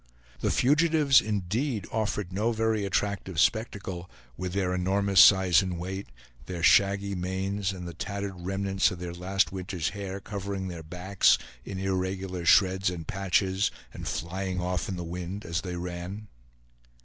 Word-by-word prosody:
The - - 0
fugitives, 150 0 +4
indeed, 105 +4 -2
offered 105 -4 -2
no 105 +5 +1
very 110 -2 0
attractive 95 -3 -1
spectacle, 95 -2 0 0.3
with 90 +3 -4
their 95 -2 0
enormous 95 +1 +3
size 95 -4 +7
and 90 -2 -3
weight, 95 +3 -5 0.4
their 90 -2 -5
shaggy 100 +2 +4
manes 95 +2 -2
and 90 -2 -7
the 85 - -6
tattered 100 +3 -4
remnants 95 +2 0
of 90 - -6
their 85 0 -6
last 95 +3 0
winter's 90 -3 -3
hair 100 -1 -5
covering 100 -1 -4
their 85 -2 -6
backs 90 +4 +2 0.3
in 95 - -6
irregular 95 -1 -2
shreds 95 -1 +5
and 85 -3 -6
patches, 95 +2 +1 0.2
and - - -7
flying 95 +2 -3
off 90 +1 -2
in 95 - -2
the 90 - -4
wind 90 +4 -5
as 85 -1 -2
they 90 -1 -5
ran. 90 +4 -6
95 Hz, 150 wpm, -28 LUFS, 90-100 Hz, 0.4 s, size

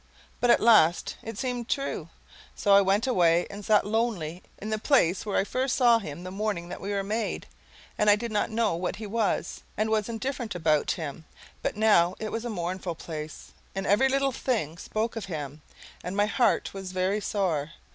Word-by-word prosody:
But 245 - +2
at 235 - +6
last 195 -8 +4
it 225 -2 -7
seemed 245 -1 -3
true, 275 0 -2 0.5
so 200 - +3
I 200 - +8
went 200 +4 +2
away 175 -8 +3
and 200 +1 -8
sat 210 0 +3
lonely 205 -7 -1 0.2
in 215 +2 -6
the 215 - 0
place 210 - +2
where 205 - 0
I - - +3
first 255 +5 -1
saw 240 -3 +5
him 170 -4 -7
the 185 - -6
morning 195 -3 -2
that - - -7
we 195 - -5
were 200 -1 0
made 215 +3 -2 0.5
and 210 - +4
I 205 - +8
did 230 +2 -5
not 210 - 0
know 220 -4 +1
what 180 +2 -2
he 220 - -7
was 215 0 -1 0.2
and 220 +1 0
was 215 0 +1
indifferent 235 -1 -3
about 155 -3 +2
him; 160 -2 -4 0.4
but - - -2
now 190 -5 +4
it 215 -1 -4
was 225 +1 -3
a - - -2
mournful 180 -3 -3
place, 155 -1 -7 0.2
and 195 0 -2
every 230 +8 +4
little 275 0 +2
thing 205 - -2
spoke 220 +2 -2
of 225 -3 -4
him, 150 -5 -6 0.4
and 180 +3 -4
my 205 - +4
heart 235 +3 +1
was 190 -1 -7
very 185 +3 0
sore. 165 -8 -1
205 Hz, 200 wpm, -27 LUFS, 175-225 Hz, 0.5 s, I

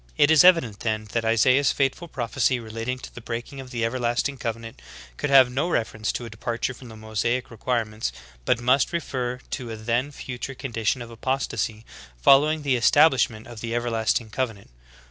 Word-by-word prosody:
"^ - - -32
23. - - +4
It 145 - +5
is 160 0 +7
evident 165 - +5
then 110 -1 -1
that 115 - 0
Isaiah's 125 +5 +4
fateful 140 +5 -1
prophecy 130 -2 0
re 110 -2 -10
lating 115 +3 -3
to - - -9
the 120 - -9
breaking 120 +4 -6
of 130 -1 -8
the 120 -3 -1
everlasting 120 +3 -1
covenant, 115 - -5 0.3
could 145 - -3
have 130 -2 +7
no 145 +7 -1
reference 110 -7 -1
to 120 - -4
a - - -7
departure 115 +3 -3
from 125 0 -13
the 110 - -11
Mosaic 110 +4 -2
require 115 0 -1
ments, 110 - -4 0.3
but 120 - +1
must 130 +6 +2
refer 125 -7 -2
to 125 -4 -4
a 110 - -5
then 120 +5 -1
future 130 0 -6
condition 120 -1 -2
of 115 - -11
apostasy 115 -3 -2 0.3
following 150 - +5
the 135 -3 +2
establishment 125 -4 +4
of 120 -2 -10
the 115 0 -3
everlasting 115 -1 0
covenant. 115 - -4
120 Hz, 190 wpm, -24 LUFS, 115-130 Hz, 0.3 s, is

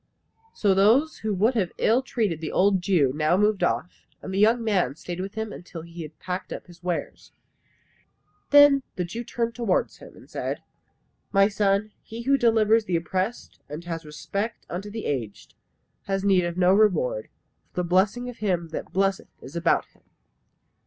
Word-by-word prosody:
So 200 -3 +3
those 230 +11 +3
who 220 - -2
would 220 +7 +3
have 200 -7 0
ill 235 +4 +3
treated 210 - -2
the 160 - -4
old 190 -1 +3
Jew 170 -8 +2
now 155 +4 +2
moved 210 0 +2
off, 180 - -2
and 190 - -7
the 195 - 0
young 230 +3 +4
man 195 -9 +1
stayed 175 +2 -7
with 195 +2 -5
him 220 -1 -4
till 170 -2 -9
he 170 0 -9
had 155 -1 -9
packed 180 +1 -5
up - - -6
his 175 -1 -16
wares. 175 -1 -4 1.2
Then 290 -1 +7
the 180 - -2
Jew 225 +8 -6
turned 235 0 -2
towards 230 -5 0
him - - -14
and - - -16
said, - - -4 0.7
"My 195 -1 +5
son, 200 +1 +1
he 230 +1 -8
who 275 +3 +3
delivers 225 -3 +3
the 180 - -1
oppressed, 185 +7 -3
and 150 +3 -6
has 165 -1 -5
respect 200 +9 -5
unto 195 +4 -4
the 220 +1 -6
aged, 115 -8 -4 0.5
has 195 0 -1
need 190 -3 +3
of 175 0 -4
no 185 0 +5
reward, 330 - +2 0.4
for 180 - -2
the - - -4
blessing 195 +7 +2
of 245 - -7
Him 180 -5 -1
that 160 - -6
blesseth 195 0 0
is 135 - -11
about 170 0 +2
him. - - -30
195 Hz, 180 wpm, -25 LUFS, 175-220 Hz, 1.2 s, Then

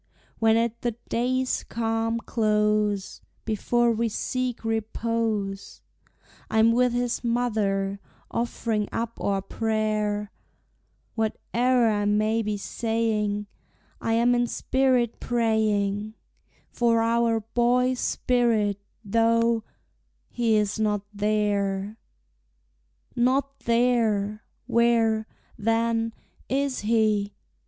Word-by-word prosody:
When 225 0 +4
at 230 0 -1
the 240 -2 -1
day's 255 +2 0
calm 225 0 -1
close, 210 -3 0 0.2
Before 235 +2 +1
we 230 0 0
seek 250 +2 -3
repose, 220 -2 -2 0.7
I'm 220 +1 +4
with 250 +1 +3
his 245 0 -1
mother, 210 -5 0 0.3
offering 225 -3 -1
up 230 0 -4
our 195 -1 0
prayer; 215 -1 -1 0.8
Whate'er 240 +2 +1
I 205 -2 +1
may 215 +2 +2
be 210 -1 -2
saying, 215 -1 -1 0.6
I 225 - 0
am 235 +2 +3
in 240 0 +2
spirit 255 -2 +1
praying 215 -3 0 0.6
For 230 -1 +2
our 230 -1 +2
boy's 250 +1 +2
spirit, 225 -5 +1 0.3
though 230 +1 +2 0.7
he 230 -2 +1
is 210 0 0
not 210 -2 +1
there! 205 0 0 1.2
Not 270 +3 +1
there! 230 -3 +1 0.2
Where, 230 -2 +2 0.3
then, 225 +1 +1 0.4
is 275 0 0
he? 210 -2 +1
225 Hz, 95 wpm, -25 LUFS, 210-235 Hz, 1.2 s, When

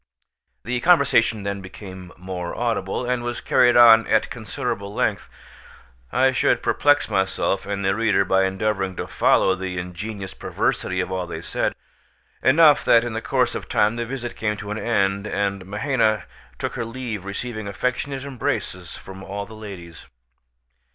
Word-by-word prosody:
The 125 +1 -2
conversation 120 - +3
then 100 0 -3
became 95 -1 -10
more 90 -1 -5
audible, 115 -1 -1
and 125 -1 0
was 120 0 -3
carried 120 -1 +4
on 115 -2 +8
at - - +2
considerable 100 0 -4
length. - - -1 0.8
I - - +3
should - - +1
perplex 145 0 +3
myself 95 -1 0
and 100 -1 -2
the 95 - +3
reader 105 -3 +2
by 95 0 +3
endeavouring 95 -1 -1
to - - -4
follow 95 - +3
the 95 -1 -4
ingenious 95 +3 -6
perversity 90 0 -1
of 90 - -4
all 90 -1 -2
they 80 0 -6
said; - - -1 0.7
enough, 145 -1 +6
that 115 0 +5
in 120 -1 -4
the 115 - -3
course - - +1
of - - -6
time 105 +2 +2
the 120 0 -3
visit 120 -1 -5
came 105 -1 -1
to 105 0 -7
an 105 - -3
end, 100 -3 0
and 100 -1 -2
Mahaina 110 0 +1 0.3
took - - -3
her 120 - -3
leave 115 -4 -5
receiving 110 +2 -5
affectionate 125 +6 -2
embraces 90 -9 -3
from 95 0 -11
all 100 +1 -5
the 110 - -13
ladies. 95 -6 -10
105 Hz, 160 wpm, -23 LUFS, 95-120 Hz, 0.8 s, on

